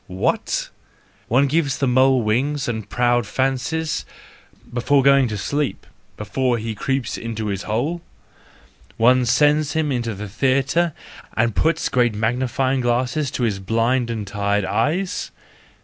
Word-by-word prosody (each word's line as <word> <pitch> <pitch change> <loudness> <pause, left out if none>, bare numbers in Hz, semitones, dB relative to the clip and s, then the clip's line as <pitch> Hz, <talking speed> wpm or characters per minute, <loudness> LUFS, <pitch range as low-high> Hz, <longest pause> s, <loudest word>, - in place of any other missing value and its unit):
What? 90 0 -1 0.6
One 130 +5 +3
gives 145 -1 0
the 140 - 0
mole 130 0 +4
wings 135 +7 0
and 110 -3 -4
proud 120 -2 +1
fancies—before 135 -1 -2
going 140 -1 +5
to 105 -2 -4
sleep, 145 +8 -2 0.3
before 125 +3 0
he 110 0 -4
creeps 135 +4 -2
into 110 -2 -4
his 100 -1 -2
hole? 145 +11 -1 1.0
One 125 +2 +4
sends 150 +4 +3
him 160 -2 0
into 120 -4 -2
the 105 +2 -6
theatre 135 - +1 0.4
and 115 -1 +1
puts 160 0 +1
great 120 -3 +1
magnifying 130 +4 0
glasses 125 +4 0
to 125 - -3
his 105 -4 0
blind 115 +5 0
and 110 -3 -3
tired 100 0 -1
eyes? 175 - -1
125 Hz, 135 wpm, -21 LUFS, 115-140 Hz, 1.0 s, going